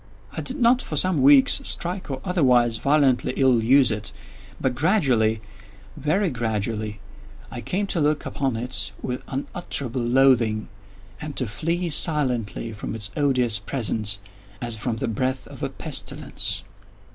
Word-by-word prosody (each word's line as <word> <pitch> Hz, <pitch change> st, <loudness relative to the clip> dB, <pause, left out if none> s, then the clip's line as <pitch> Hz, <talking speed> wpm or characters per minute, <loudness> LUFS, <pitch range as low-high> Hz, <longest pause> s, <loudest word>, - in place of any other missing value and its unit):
I -, -, -4 dB
did 265 Hz, +3 st, -3 dB
not, 245 Hz, +1 st, +4 dB
for 155 Hz, -, -6 dB
some 170 Hz, -1 st, +3 dB
weeks, 135 Hz, 0 st, +6 dB
strike, 180 Hz, 0 st, -2 dB
or 135 Hz, -1 st, -4 dB
otherwise 125 Hz, -10 st, +3 dB
violently 135 Hz, -2 st, +2 dB
ill 130 Hz, -4 st, +3 dB
use 130 Hz, +1 st, +5 dB
it; 105 Hz, 0 st, -4 dB, 0.5 s
but 130 Hz, -, 0 dB
gradually—very 115 Hz, -, 0 dB
gradually—I 105 Hz, -1 st, -5 dB
came 200 Hz, +9 st, -1 dB
to 175 Hz, -4 st, -2 dB
look 150 Hz, 0 st, +1 dB
upon 135 Hz, -4 st, -2 dB
it 110 Hz, -3 st, -3 dB
with 125 Hz, 0 st, -3 dB
unutterable 135 Hz, -3 st, -2 dB
loathing, 120 Hz, -3 st, +3 dB, 0.5 s
and 150 Hz, -1 st, -6 dB
to 130 Hz, -, -1 dB
flee 170 Hz, -, -2 dB
silently 125 Hz, -, 0 dB
from 105 Hz, +1 st, -6 dB
its 100 Hz, -3 st, -5 dB
odious 125 Hz, -7 st, +2 dB
presence, 105 Hz, -2 st, -1 dB, 0.4 s
as 120 Hz, -2 st, -3 dB
from 110 Hz, +2 st, -2 dB
the -, -, -2 dB
breath 130 Hz, +4 st, -1 dB
of -, -, -12 dB
a -, -, -1 dB
pestilence. -, -, -3 dB
125 Hz, 135 wpm, -24 LUFS, 110-145 Hz, 0.5 s, weeks